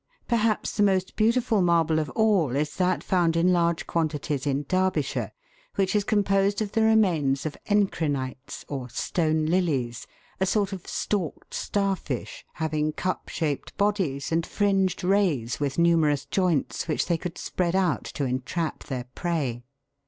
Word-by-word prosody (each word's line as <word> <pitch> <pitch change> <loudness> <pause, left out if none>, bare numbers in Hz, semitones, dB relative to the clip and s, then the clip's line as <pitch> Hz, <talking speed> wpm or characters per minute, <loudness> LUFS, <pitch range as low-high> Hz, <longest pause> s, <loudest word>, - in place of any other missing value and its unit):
Perhaps 230 -3 +1
the - - +2
most 190 -2 +2
beautiful 225 -1 +2
marble 165 -2 +3
of 155 -2 -2
all 200 - +3
is 150 +1 -1
that 185 -1 +1
found 175 -3 +2
in 180 +2 +4
large 170 -1 +1
quantities 150 -4 -1
in 140 +1 0
Derbyshire, 185 0 0 0.4
which 190 0 +1
is 205 - +3
composed 200 -1 +2
of 210 -2 -2
the 225 - +1
remains 175 -12 +3
of 155 - -3
encrinites, 145 -10 -1
or 130 -3 -5
stone 155 +4 0
lilies, 150 -9 0 0.3
a 190 - +1
sort 200 0 +1
of 185 -3 -8
stalked 190 -7 -3
star 200 -1 0
fish, 135 -8 -6
having 155 -1 -1
cup 185 +4 -3
shaped 150 -4 -3
bodies 190 -10 0
and 165 +1 +2
fringed 195 -3 +1
rays 180 - +1
with 140 -2 -2
numerous 160 -4 +3
joints 180 -6 0
which 155 - 0
they 170 - +1
could 175 0 -5
spread 180 -1 -1
out 180 -7 +1
to 140 - -3
entrap 130 +6 -2
their 130 -3 -4
prey. 150 -9 -2
170 Hz, 150 wpm, -26 LUFS, 150-195 Hz, 0.4 s, in